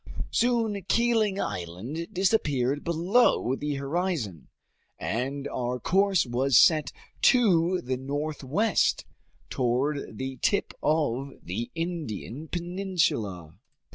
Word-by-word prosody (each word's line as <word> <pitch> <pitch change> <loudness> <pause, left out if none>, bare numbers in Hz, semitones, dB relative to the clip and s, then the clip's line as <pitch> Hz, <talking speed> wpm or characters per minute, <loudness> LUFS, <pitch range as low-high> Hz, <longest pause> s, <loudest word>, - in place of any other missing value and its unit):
Soon 230 -4 +1
Keeling 225 -4 +2
Island 95 - -4
disappeared 145 - +1
below 170 - +2
the 145 +1 -3
horizon, 140 - -2 0.5
and 135 +5 -3
our 125 0 -2
course 190 - +2
was 125 +1 +2
set 155 -3 +5 0.3
to 185 -8 +4
the 130 +1 -2
northwest, 150 - 0 0.5
toward 130 +4 -1
the 130 0 -4
tip 200 - +1
of 140 -3 0
the 110 +7 -4
Indian 160 - -4
peninsula. 170 - -2
150 Hz, 95 wpm, -27 LUFS, 125-185 Hz, 0.5 s, set